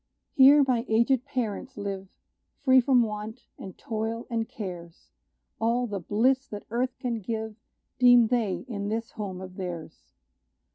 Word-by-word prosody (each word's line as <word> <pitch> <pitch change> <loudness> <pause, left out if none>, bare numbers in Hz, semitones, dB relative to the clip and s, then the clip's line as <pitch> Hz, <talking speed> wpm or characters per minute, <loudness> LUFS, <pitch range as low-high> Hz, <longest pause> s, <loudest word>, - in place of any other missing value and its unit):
Here 280 +1 +7
my 240 -3 +1
aged 235 +3 +2
parents 250 +1 -4
live 195 -1 -5 0.6
Free 260 -2 +6
from 250 -1 +4
want, 215 +2 -6
and 190 - -9
toil, 225 +1 -4
and 225 -1 -1
cares; 175 -7 -8 0.5
All 235 +2 +1
the 205 -4 -4
bliss 255 - +1
that 205 -1 -8
earth 250 +2 -1
can 235 -2 -3
give 220 +1 -4 0.4
Deem 245 -2 +7
they 235 -5 -1
in 205 -4 -4
this 225 +1 -3
home 195 -4 -6
of 185 -1 -10
theirs. 170 -4 -7
225 Hz, 145 wpm, -27 LUFS, 205-245 Hz, 0.6 s, Here